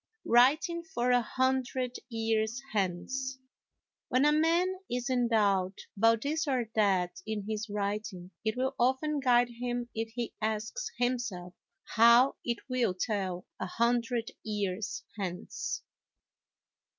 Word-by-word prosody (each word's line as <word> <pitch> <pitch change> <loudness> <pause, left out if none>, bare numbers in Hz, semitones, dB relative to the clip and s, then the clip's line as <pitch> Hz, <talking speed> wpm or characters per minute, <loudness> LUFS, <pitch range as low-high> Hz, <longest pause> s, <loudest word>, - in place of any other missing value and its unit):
Writing 295 +8 +4
for 330 -9 -1
a 245 0 +5
Hundred 260 0 0
Years 225 0 0
Hence 220 +8 -1 0.7
When 255 +2 +3
a 295 - +6
man 340 +5 +2
is 245 +2 -2
in 245 -2 +2
doubt 200 -4 +2 0.2
about 225 +2 +4
this 310 +2 -1
or 245 -5 0
that 185 -5 +1
in 215 -2 -3
his 220 0 -3
writing, 200 -2 -3
it 220 +1 -1
will 260 +1 0
often 265 +5 +2
guide 245 -2 +4
him 245 -1 -2
if 225 0 -3
he 240 -2 -3
asks 220 - -2
himself 240 -8 -2 0.4
how 235 +3 +6
it 235 -1 -3
will 250 -7 +1
tell 190 -5 -2
a - - -2
hundred 235 +2 0
years 205 -1 -3 0.2
hence. 180 -2 -4
235 Hz, 125 wpm, -30 LUFS, 210-255 Hz, 0.7 s, a